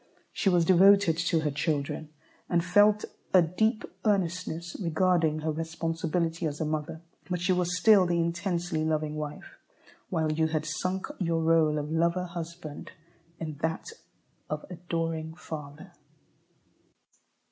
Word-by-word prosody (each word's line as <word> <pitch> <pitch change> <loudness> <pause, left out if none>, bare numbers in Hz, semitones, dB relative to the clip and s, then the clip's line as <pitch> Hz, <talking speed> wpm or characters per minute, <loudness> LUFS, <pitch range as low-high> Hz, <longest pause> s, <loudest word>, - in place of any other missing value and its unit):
She 195 - +1
was 175 -2 +3
devoted 190 -1 +6
to 170 -1 +1
her 150 -2 0
children, 145 0 -2 0.4
and 170 0 +1
felt 205 +3 +4 0.3
a 180 - +8
deep 215 +7 0 0.2
earnestness 175 -4 -1
regarding 165 -2 +2
her 155 +1 -1
responsibility 165 +1 -2
as 145 -1 -5
a 160 - 0
mother. 155 +1 -3 0.3
But 180 -1 -1
she 180 +2 +2
was 180 0 0
still 195 0 +6
the 170 0 +1
intensely 170 -1 -1
loving 155 -1 -1
wife, 150 -1 -7 0.5
while 160 -1 0
you 160 +1 +1
had 155 -1 -2
sunk 185 +5 -2
your 165 -3 0
rôle 160 -2 +3
of 150 +1 -3
lover 170 +3 +1
husband 170 -3 -7 0.5
in 155 -3 -5
that 160 0 -1 0.6
of 150 0 -4
adoring 165 -2 -3
father. 150 -3 -8
165 Hz, 135 wpm, -28 LUFS, 155-180 Hz, 0.6 s, a